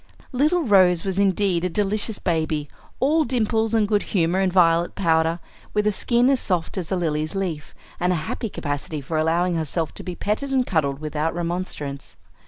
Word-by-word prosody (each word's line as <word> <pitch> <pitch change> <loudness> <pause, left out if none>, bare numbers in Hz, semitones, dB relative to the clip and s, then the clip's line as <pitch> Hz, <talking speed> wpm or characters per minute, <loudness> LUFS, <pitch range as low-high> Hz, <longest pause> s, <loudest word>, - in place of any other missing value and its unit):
Little 305 +7 +2
Rose 185 - +4
was 195 0 -2
indeed 195 -3 +2
a 180 - 0
delicious 210 +3 0
baby, 155 -3 -1 0.3
all 310 +4 +3
dimples 225 -3 0
and 215 -2 +3
good 205 -1 +2 0.2
humor 170 +2 +2
and 190 -1 +2
violet 170 -2 +3
powder, 165 -2 +1 0.4
with 210 0 +2
a 210 - +3
skin 240 +4 +2
as 270 - +2
soft 180 -6 -1
as 175 - -6
a - - +2
lily's 155 -2 -1
leaf, 175 -6 -4 0.2
and 180 +1 +1
a - - +2
happy 225 - -3
capacity 145 -2 -4
for 155 +3 -3
allowing 170 +3 +1
herself 160 0 -2
to - - -7
be 180 -1 -5
petted 215 +10 -2
and 260 -2 +2
cuddled 145 - 0
without 155 +2 -2
remonstrance. 170 -5 -4
180 Hz, 185 wpm, -23 LUFS, 160-210 Hz, 0.4 s, Rose